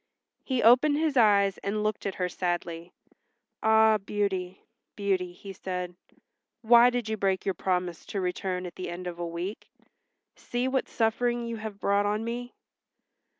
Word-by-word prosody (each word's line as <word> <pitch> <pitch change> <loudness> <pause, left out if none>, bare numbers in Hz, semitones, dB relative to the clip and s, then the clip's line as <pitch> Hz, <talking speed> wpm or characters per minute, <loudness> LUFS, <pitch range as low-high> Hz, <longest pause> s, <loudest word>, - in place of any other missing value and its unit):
He 260 -3 -1
opened 255 +6 +6
his 310 -2 0
eyes 200 -5 +4
and 210 +2 -2
looked 215 -1 -1
at 195 - -3
her 180 - -1
sadly. 175 -1 -3 0.7
"Ah, 220 0 +5
Beauty, 195 -2 -2 0.3
Beauty," 190 -3 -1
he 195 +2 -10
said, 180 -1 -5 0.7
"why 235 +2 +7
did 245 -2 -2
you 220 - -1
break 190 -2 0
your 195 - +1
promise 180 -1 -2
to 200 - -3
return 180 0 -2
at 175 - -7
the 185 - -6
end 175 +1 -6
of 175 -1 -6
a 170 - -2
week? 175 +5 -5 0.7
See 245 +1 -2
what 260 0 0
suffering 240 +1 0
you 230 -1 -4
have 215 -2 -7
brought 200 0 +2
on 210 +2 -1
me." 245 +1 -5
200 Hz, 160 wpm, -28 LUFS, 180-225 Hz, 0.7 s, why